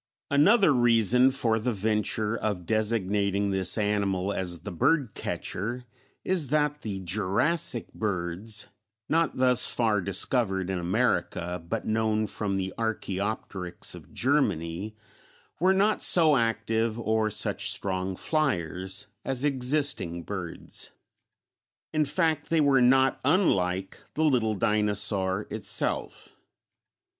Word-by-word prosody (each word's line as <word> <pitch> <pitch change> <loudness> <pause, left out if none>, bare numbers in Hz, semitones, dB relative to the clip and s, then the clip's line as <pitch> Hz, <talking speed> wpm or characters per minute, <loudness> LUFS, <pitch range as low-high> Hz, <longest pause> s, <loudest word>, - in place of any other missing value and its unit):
Another 180 +4 +5
reason 120 +1 +4
for 115 -4 0
the 125 +3 -1
venture 105 +1 0
of 100 -6 -3
designating 100 -2 0
this 95 0 +2
animal 100 -2 0
as 90 -3 -4
the 105 - -7
"bird 135 - +1
catcher" 120 +6 -4 0.4
is 180 -6 0
that 150 +1 0
the 100 -3 -5
Jurassic 105 - +1
birds 100 +1 -3 0.4
(not 165 +1 +1
thus 125 -1 +3
far 110 -4 +1
discovered 95 0 0
in 95 - -2
America, 90 -3 -1
but 115 - -3
known 110 0 0
from 100 -2 -2
the 95 -1 -3
Archæopteryx 100 -4 -3
of - - -13
Germany) 105 - -1 0.6
were 185 +3 +4
not 200 +3 +2
so 160 -4 +5
active 115 -1 0
or 110 -1 0
such - - -1
strong 95 -1 -1
fliers 95 - -2 0.2
as 135 +1 -1
existing 130 - +1
birds; 95 -4 -7 1.0
in 155 -1 +2
fact, 160 +2 0
they 165 - +2
were 140 -3 +4
not 130 +1 +4
unlike 95 - +1
the 155 - 0
little 120 -8 +2
dinosaur 105 -1 +1
itself. 110 -2 -2
110 Hz, 115 wpm, -27 LUFS, 95-130 Hz, 1.0 s, Another